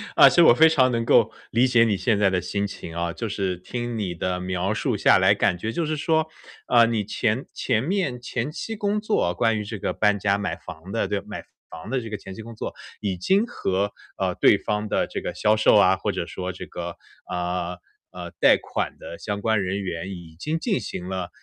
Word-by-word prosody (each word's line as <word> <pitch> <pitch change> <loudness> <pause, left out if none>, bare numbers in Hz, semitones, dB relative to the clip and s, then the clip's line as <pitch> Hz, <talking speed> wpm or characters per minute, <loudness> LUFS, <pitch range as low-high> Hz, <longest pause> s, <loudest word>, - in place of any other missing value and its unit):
啊， - - +9
其 - - -2
实 175 - +7
我 120 - +8
非 160 +5 +7
常 130 -5 +3
能 115 -1 -1
够 - - +4 0.2
理 120 +3 +4
解 120 -2 +5
你 110 -3 +2
现 110 +1 +1
在 100 -2 +3
的 90 -1 0
心 100 +2 -2
情 85 -4 -8
啊。 85 0 -2
就 105 +6 -4
是 95 -2 -1
听 120 +5 -5
你 90 -4 -3
的 90 +1 -2
描 90 +2 -1
述 - - -1
下 - - +5
来， - - +5
感 - - +2
觉 110 +5 -3
就 165 +6 -1
是 155 0 -1
说， 160 +1 +1 0.4
啊， 120 -1 +5
你 115 -3 -1
前 110 +4 -1
前 115 -3 0
面 180 -6 -1
前 125 +3 -3
期 225 +7 -5
工 205 0 0
作， 210 - +1
关 110 -1 +1
于 - - -3
这 105 +1 -6
个 - - -2
搬 105 -1 +2
家 100 0 +1
买 105 - -2
房 80 +2 -11
的 115 -3 0
这 100 -1 -1
买 - - -8 0.3
房 80 - -9
的 130 -2 0
这 115 - -7
个 105 - -4
前 95 - -10
期 110 - -8
工 115 +1 -10
作， - - -5 0.3
已 95 -3 -2
经 190 - +2
和， 100 - -2 0.2
呃， - - 0
对 - - +5
方 105 +1 -2
的 - - +1
这 - - -5
个 - - -5
销 105 +1 +3
售 110 - +4
啊， 95 -2 +6
或 - - -1
者 - - -3
说 90 0 -5
这 90 - -8
个， 85 0 -6 0.3
啊， 90 0 -3 0.3
啊， - - -8
贷 - - +7
款 - - -4
的 85 - -9
相 105 -1 -3
关 110 -1 +1
人 95 +2 -2
员 90 +1 -4
已 85 -4 -9
经 155 +8 -1
进 200 +3 0
行 90 - -6
了， 95 -2 -4
105 Hz, 250 characters per minute, -24 LUFS, 95-120 Hz, 0.4 s, 啊